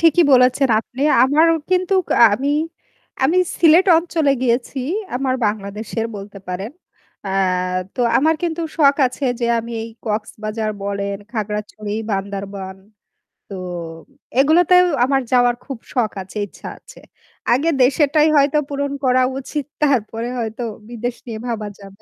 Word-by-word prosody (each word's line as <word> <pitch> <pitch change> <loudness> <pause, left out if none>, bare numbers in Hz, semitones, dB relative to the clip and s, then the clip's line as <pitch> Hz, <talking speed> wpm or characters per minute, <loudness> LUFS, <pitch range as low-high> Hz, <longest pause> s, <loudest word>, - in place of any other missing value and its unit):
ঠিকই 335 +1 +5
বলেছেন, 255 +1 +4
আপনি। 260 +4 -7 0.2
আমারও 315 +5 +4 0.2
কিন্তু 370 +1 +2
কা - - +1 0.2
আমি, 275 +5 -2 0.7
আমি 315 +7 +3 0.2
সিলেট 340 +3 +6
অঞ্চলে 320 -4 +1
গিয়েছি 245 +2 0 0.4
আমার 260 0 0
বাংলাদেশের 210 +2 -3
বলতে 200 0 -9
পারেন। 190 +5 -4 0.5
অ্যা 190 - -3 0.6
তো - - -3 0.2
আমার 315 +4 +3
কিন্তু 335 -1 -2 0.2
শখ 280 -3 +4
আছে 255 +3 -5 0.2
যে 235 - +1
আমি 230 +1 -6
এই 230 - -6 0.2
কক্সবাজার 215 0 -3
বলেন, 200 0 -2 0.2
খাগড়াছড়ি, 210 -1 -4 0.2
বান্দরবান 195 -1 -4 0.7
তো 195 - -6 0.8
এগুলোতেও 355 +5 +5 0.2
আমার 270 0 +1
যাওয়ার 245 -1 +4
খুব 270 -4 -6 0.2
শখ 235 -4 +1
আছে, 195 +3 -11
ইচ্ছা - - -11
আছে। - - -16 0.5
আগে 285 +7 +2
দেশেরটাই 295 +3 +3
হয়তো 280 +1 +3
পূরণ 280 0 -2
করা 255 0 +3 0.2
উচিত 285 +1 -4 0.2
তারপরে 235 -4 0
হয়তো 225 +1 -4 0.3
বিদেশ 240 +1 -4
নিয়ে 225 -3 -6
ভাবা 220 -3 -3
যাবে। 195 0 -14
250 Hz, 135 wpm, -19 LUFS, 215-285 Hz, 0.8 s, সিলেট